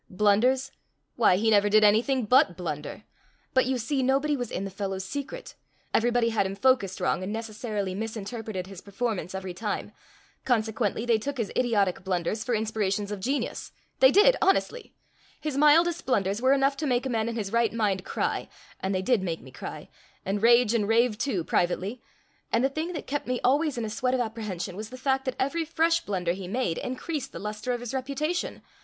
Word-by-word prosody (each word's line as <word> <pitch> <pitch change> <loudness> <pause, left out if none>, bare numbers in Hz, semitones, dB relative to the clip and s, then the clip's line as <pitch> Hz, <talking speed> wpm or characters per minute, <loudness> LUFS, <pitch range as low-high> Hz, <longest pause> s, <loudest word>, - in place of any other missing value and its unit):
Blunders? 225 +7 +2 0.4
Why, 225 -6 +4
he 220 +4 +2
never 205 -1 +4
did 215 +1 +5
anything 230 +4 +3
but 210 -7 +4
blunder. 150 -5 -5 0.5
But, 260 -1 +3
you 260 0 +1
see, 265 +4 -1
nobody 275 +3 +2
was 245 -4 -4
in 195 - -3
the 195 - -6
fellow's 195 -1 -4
secret&#8212everybody 245 - -2
had 215 -4 +1
him 195 - -5
focused 200 -5 +2
wrong, 180 - 0
and 190 +2 -4
necessarily 215 -3 -3
misinterpreted 220 -1 -5
his 190 -1 -10
performance 200 -2 -3
every 190 -1 -5
time&#8212consequently 225 - -3
they 230 -2 +3
took 280 +5 -4
his 230 -4 -2
idiotic 205 -7 +1
blunders 185 +3 -1
for 245 - 0
inspirations 210 -2 -1
of 205 - -4
genius; 270 +8 -3 0.3
they 260 - +8
did, 415 - +6
honestly! 465 +5 +1 0.4
His 300 -3 -3
mildest 315 +3 +4
blunders 200 -3 +1
were 260 +1 +5
enough 275 0 +2
to 300 - -2
make 250 0 +1
a - - 0
man 230 -2 0
in 230 - -4
his 205 -4 -3
right 235 0 +2
mind 205 -5 0
cry; - - -2 0.3
and 190 0 -1
they 185 - -1
did 240 -1 +2
make 170 -3 -3
me 130 - -13
cry&#8212and 195 +8 -7
rage 235 0 +5
and 215 -3 +1
rave 230 0 +3
too, 205 -12 -1
privately. 185 +8 -1 0.5
And 230 - +2
the - - +2
thing 315 +5 -3
that 315 - -5
kept 290 +1 -3
me 250 -1 -1
always 290 +2 +2
in 235 - -2
a - - -4
sweat 255 +3 0
of - - -1
apprehension 215 -6 -4
was 215 +2 -6
the 255 - -9
fact 265 0 0
that 260 - -2
every 325 +5 0
fresh 330 +1 +1
blunder 180 -4 -1
he 185 0 -7
made 200 -5 -1
increased 280 +3 -4
the - - -8
luster 210 +3 -4
of 245 -1 -2
his 245 +1 -6
reputation! 280 +6 -2
230 Hz, 190 wpm, -27 LUFS, 200-265 Hz, 0.5 s, they